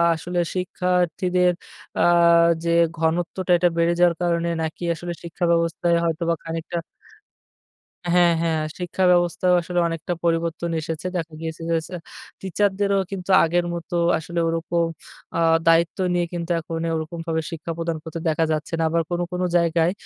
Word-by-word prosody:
আসলে 175 +2 -3 0.2
শিক্ষার্থীদের 180 -1 +1 0.5
আ - - +3 0.6
যে 170 - -1 0.3
ঘনত্বটা 170 +3 -1
এটা 175 +1 +3
বেড়ে 170 0 +3
যাওয়ার 175 -1 +4
কারণে 170 -1 +1
নাকি 160 +2 -4
আসলে 175 +2 -5
শিক্ষা 170 +1 -6
ব্যবস্থায় 170 0 +1
হয়তোবা 170 0 0
খানিকটা 165 +1 -4 1.4
হ্যাঁ, 175 -1 +5
হ্যাঁ, 165 -2 0 0.2
শিক্ষা 180 +1 -2
ব্যবস্থাও 175 +1 +2
আসলে 175 +1 -2
অনেকটা 165 +1 -3
পরিবর্তন 170 0 0
এসেছে। 160 +2 -4
দেখা 165 -1 -5
গিয়েছে 160 0 -5
যে, 165 - +2 0.7
টিচারদেরও 200 +1 +1
কিন্তু 190 -1 -6
আগের 175 +1 +1
মতো 170 0 -5 0.2
আসলে 170 +2 -4
ওরকম 165 +1 0 0.5
আ - - +1 0.3
দায়িত্ব 165 0 +4 0.2
নিয়ে 175 -1 +1
কিন্তু 170 0 -3
এখন 165 +1 -5 0.2
ওরকমভাবে 165 0 -3
শিক্ষা 165 0 -5
প্রদান 165 -1 -2
করতে 165 0 -6
দেখা 160 +1 +1
যাচ্ছে 155 +2 -3
না। - - +2
আবার 165 +1 +1
কোনো, 175 0 0
কোনো, 180 0 -1
জায়গায় 170 0 +2
170 Hz, 145 wpm, -23 LUFS, 165-175 Hz, 1.4 s, হ্যাঁ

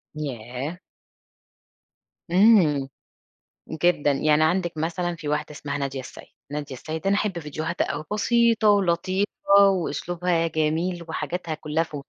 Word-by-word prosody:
ياه! 135 +3 -5 1.5
امم. 175 -9 +5 1.0
جدًا 160 -4 +3
يعني 150 +2 +3
عندك 175 0 0
مثلًا 170 +2 -2
في 155 -2 -8
واحدة 150 +1 -1
اسمها 145 -1 -5
نادية 135 -1 -3
السيد، 130 - -10 0.2
نادية 145 -2 -5
السيد 155 +7 -5
أنا 200 - +3
أحب 205 -4 -1
فيديوهاتها 155 +3 -3
أوي - - -4
بسيطة 230 0 +3
ولطيفة 190 0 +2 0.4
وأسلوبها 175 -2 -1
جميل 165 +3 -1
وحاجاتها 160 +1 -3
كلّها 155 +1 -1
ف، 155 -2 -10
165 Hz, 120 wpm, -24 LUFS, 150-180 Hz, 1.5 s, امم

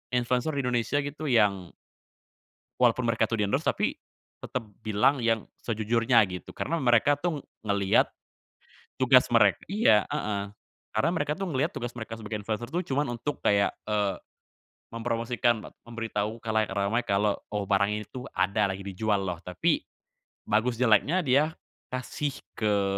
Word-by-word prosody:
influencer 125 +4 +1
di 135 - 0
Indonesia 125 +3 0
gitu 150 +2 -5
yang 100 -6 +2 1.1
walaupun 125 0 +3
mereka 115 0 +1
tuh 115 - -1
di 105 - +2
endorse, 100 - 0
tapi - - +1 0.5
tetep 125 -3 -4 0.2
bilang 110 +6 +2
yang 115 -2 +1 0.2
sejujurnya 115 +1 +2
gitu, 90 - -8
karena 165 0 -1
mereka 120 +2 +4
tuh 165 -5 -2 0.2
ngeliat 100 -1 +2 0.9
tugas 130 -1 +5
mereka 105 -3 +5
iya, 180 - +4
heeh 100 -1 -3 0.4
karena 110 +10 +2
mereka 150 -2 -1
tuh 195 - -3
ngeliat 150 +7 0
tugas 120 0 -4
mereka 115 0 -5
sebagai 110 -1 -5
influencer 110 +3 -4
tuh, 175 +2 0
cuma 140 +2 +1
untuk 130 +5 -4
kayak, 100 0 +3
eee, 105 -2 0 0.7
mempromosikan, 115 0 0
met - - -10 0.2
memberitahu 115 -1 -3
khalayak 110 -1 0
ramai 100 +5 0
kalau 100 +1 +2 0.2
oh, 105 - 0
barang 100 0 +3
ini - - -7
tuh 130 +1 -7
ada 100 +2 +2
lagi 95 0 -4
dijual 100 +1 -1
loh. 90 -3 -3
Tapi 90 +1 0 0.7
bagus, 115 +3 +1
jeleknya 125 - +4
dia 145 +5 +3 0.4
kasih 130 +3 -3 0.2
ke 105 -2 +1
115 Hz, 150 wpm, -27 LUFS, 105-125 Hz, 1.1 s, tugas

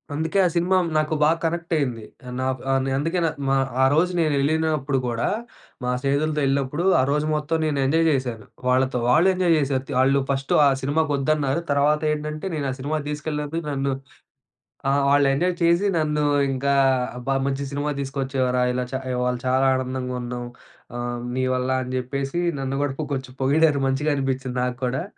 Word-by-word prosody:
అందుకే 160 +5 -1
ఆ 180 - +3
సినిమా 175 +2 +2 0.2
నాకు 155 0 0
బాగా 160 +2 +4
కనెక్ట్ 170 +1 -2
అయింది. 125 -7 -2 0.4
నాకు 130 0 -1
ఆహ్, 135 0 +1
అందుకే 165 +6 0
న - - +2 0.2
మా 135 - +3 0.3
ఆరోజు 155 +7 +3
నేను 155 -3 +2
ఎళ్ళినప్పుడు 150 -1 +1
గూడా 120 -1 -1 0.6
మా 125 - -1
స్నేహితులతో 150 +3 0
ఎళ్ళినప్పుడు 140 +3 0 0.2
ఆరోజు 145 +3 +1
మొత్తం 150 +2 0
నేను 150 -2 0
ఎంజాయ్ 165 +4 +2
చేశాను 125 -6 -2 0.2
వాళ్ళతో. 130 0 +2
వాళ్ళు 155 +8 +5
ఎంజాయ్ 180 -2 +1
త్ - - +2
చేశారు 135 0 -2
ఆళ్ళు 135 +1 +3
ఫస్ట్ 135 0 -1
ఆ - - +6
సినిమాకు 145 +3 0
ఒద్దన్నారు. 145 +1 0
తర్వాత 145 +2 +2
ఏంటంటే 150 +3 -4
నేను 145 -3 -2
ఆ - - -3
సినిమాకి 145 +2 -2
తీసుకెళ్ళినందుకు 150 +1 -3
నన్ను. 135 -1 -1 1.0
ఆ! - - +3 0.2
వాళ్ళు 145 0 +4
ఎంజాయ్ 175 +4 0
చేసి. 170 +4 +3
నన్ను 150 -1 0 0.3
ఇంకా 140 +1 0 0.4
"అబ్బా! 135 +2 -1
మంచి 140 0 -1
సినిమా 145 +1 -1
తీసుకొచ్చావురా 130 -2 -1
ఇలా 125 0 -1
చ - - -4 0.2
ఇవాళ 125 0 0
చాలా 130 +1 +3
ఆనందంగా 130 0 -3
ఉన్నాం. 120 0 -5 0.5
ఆహ్, 120 0 -3 0.2
నీ 130 - +1
వల్ల" 125 +1 -1
అని 125 0 -6
జెప్పేసి 135 +5 -2 0.2
నన్ను 135 0 -2
గూడా 145 -2 -1
కొ - - -1
కొంచెం 130 -1 -6
పొగిడారు. 145 +1 +3
మంచిగా 145 +3 0
అనిపించింది 135 -2 -2
నాకు 125 -1 -3
కూడా. 130 +5 -1
140 Hz, 170 wpm, -23 LUFS, 130-155 Hz, 1.0 s, ఆ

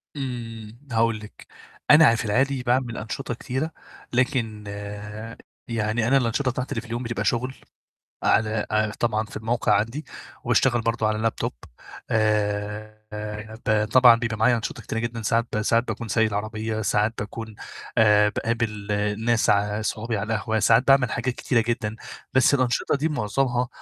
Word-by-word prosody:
إمم، 115 -4 -6
هاقول 115 -1 +2
لِك، 105 0 -13 0.4
أنا 150 +2 +9
عا 115 -3 +6
في 115 - -3
العادي 130 +4 +1
باعمل 120 -2 0
أنشِطة 120 +4 -4
كتيرة، 130 +6 -3 0.4
لكن 120 -5 0 1.0
يعني 115 0 0
أنا 135 +2 +5
الأنشِطة 130 +2 +1
بتاعتي 130 +1 -4
اللي 110 - -2
في 120 - -14
اليوم 120 +2 -3
بتبقى 115 0 -3
شُغل 130 +3 0 0.7
على 110 0 +2
ع 110 0 +1
طبعًا 110 0 -1
في - - -11
الموقع 115 +2 +1
عندي 115 +9 -3 0.4
وباشتغل 120 -3 +3
برضه 115 -1 0
على 105 0 -1
لاب 115 0 0
توب 120 +1 -3 0.6
آآ 105 0 0 0.7
ب 105 0 +3
طبعًا 125 -2 +8
بيبقى 115 -1 -2
معايا 115 +3 +4
أنشِطة 115 0 -5
كتيرة 115 - -4
جدًا 115 0 -3
ساعات 115 +2 +1
ب 105 - 0
ساعات 115 +3 +2
باكون 115 - -4
سايق 110 0 +2
العربية، 110 +1 -3
ساعات 105 +2 +1
باكون 110 +1 -6 0.4
آآ 105 -1 +6
باقابل 110 -2 -2
الناس 105 +3 +1
ع 105 +1 +1
صحابي 110 +1 -2
على 110 +3 -2
القهوة، 110 +2 -1
ساعات 115 +3 +4
باعمل 135 -3 +5
حاجات 120 +1 -1
كتيرة 120 -3 +1
جدًا، 110 -2 -1 0.4
بس 130 +2 +5
الأنشِطة 130 +1 +1
دي 150 +3 0
مُعظمها 125 -1 0
115 Hz, 160 wpm, -24 LUFS, 110-120 Hz, 1.0 s, أنا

